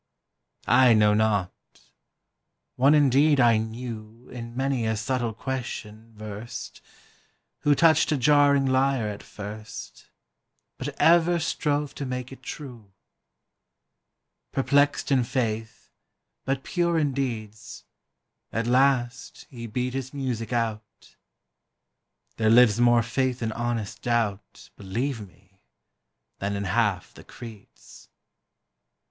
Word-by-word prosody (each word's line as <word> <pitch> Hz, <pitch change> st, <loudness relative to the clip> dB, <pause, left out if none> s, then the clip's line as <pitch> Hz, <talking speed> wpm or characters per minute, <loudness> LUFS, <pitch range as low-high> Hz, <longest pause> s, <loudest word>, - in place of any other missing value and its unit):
I 125 Hz, -1 st, +5 dB
know 105 Hz, -1 st, +4 dB
not: 105 Hz, -3 st, +1 dB, 1.2 s
one 140 Hz, +4 st, +5 dB
indeed 145 Hz, +1 st, +4 dB
I 120 Hz, -3 st, +5 dB
knew 110 Hz, +1 st, -7 dB
In 115 Hz, -1 st, -8 dB
many 135 Hz, -4 st, 0 dB
a 110 Hz, 0 st, 0 dB
subtle 120 Hz, +1 st, -1 dB
question 115 Hz, -3 st, -6 dB
versed, 110 Hz, +2 st, -8 dB, 0.8 s
Who 145 Hz, 0 st, +3 dB
touched 160 Hz, 0 st, +4 dB
a 150 Hz, -, +2 dB
jarring 140 Hz, +1 st, +4 dB
lyre 130 Hz, -3 st, +1 dB
at 105 Hz, -, -7 dB
first, 105 Hz, -, -9 dB, 0.7 s
But -, -, -6 dB
ever 170 Hz, +1 st, +5 dB
strove 150 Hz, -3 st, -1 dB
to 140 Hz, -, -5 dB
make 125 Hz, 0 st, -5 dB
it 135 Hz, -, -11 dB
true: 120 Hz, -10 st, -9 dB, 1.6 s
Perplext 145 Hz, +2 st, +1 dB
in 130 Hz, -2 st, +4 dB
faith, 115 Hz, -3 st, -3 dB, 0.5 s
but 135 Hz, 0 st, -1 dB
pure 170 Hz, -2 st, 0 dB
in 145 Hz, -3 st, +1 dB
deeds, 110 Hz, -6 st, -5 dB, 0.7 s
At 115 Hz, +2 st, -2 dB
last 125 Hz, -1 st, +1 dB
he 115 Hz, -3 st, -7 dB
beat 125 Hz, +3 st, -2 dB
his 135 Hz, +1 st, -5 dB
music 125 Hz, -5 st, -3 dB
out. 110 Hz, -3 st, -4 dB, 1.2 s
There 110 Hz, -1 st, +2 dB
lives 115 Hz, -1 st, +6 dB
more 120 Hz, -1 st, +5 dB
faith 125 Hz, +1 st, -1 dB
in 110 Hz, -, -1 dB
honest 120 Hz, -2 st, -3 dB
doubt, 115 Hz, -4 st, -2 dB
Believe 115 Hz, +5 st, -3 dB
me, 95 Hz, +2 st, -27 dB, 0.8 s
than 100 Hz, +1 st, -2 dB
in 100 Hz, -, -3 dB
half 105 Hz, -1 st, 0 dB
the -, -, -14 dB
creeds. 115 Hz, -4 st, -13 dB
120 Hz, 115 wpm, -25 LUFS, 110-135 Hz, 1.6 s, lives